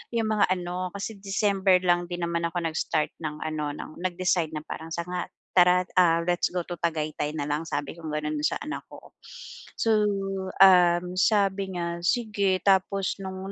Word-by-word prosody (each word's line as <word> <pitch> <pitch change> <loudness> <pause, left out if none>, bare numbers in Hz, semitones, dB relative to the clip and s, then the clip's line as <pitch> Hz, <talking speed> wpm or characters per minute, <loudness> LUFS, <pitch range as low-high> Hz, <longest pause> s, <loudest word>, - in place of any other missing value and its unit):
'yung 225 -1 +1
mga 215 -1 +3
ano, 180 0 -2
kasi 200 +1 -5
December 195 -2 +2
lang 175 -1 +2
din 175 -1 -4
naman 170 0 -2
ako 175 0 -3
nag-start 155 -1 -1
ng 150 -1 -4
ano, 155 -2 -3
ng - - -8
nag-decide 180 -3 0
na 150 - -4
parang 160 0 -7
sanga 175 +1 -3 0.3
"Tara, 180 0 +5 0.2
ah, 165 -1 +4
let's 175 0 +1
go 180 -1 -3
to 175 - -5
Tagaytay 155 -3 -1
na 145 - -2
lang." 150 +1 0
Sabi 145 -2 -3
kong 160 -2 -7
gano'n 150 0 -2
sa - - +1
anak 305 - -5
ko. - - -14 0.6
So, 220 -2 +3 0.6
um, 180 -1 +6
sabi 195 -1 +2
niya, 170 -1 -3
"Sige." 205 -4 +1
Tapos 195 0 +2
no'ng 190 0 -6
180 Hz, 170 wpm, -26 LUFS, 165-195 Hz, 0.6 s, um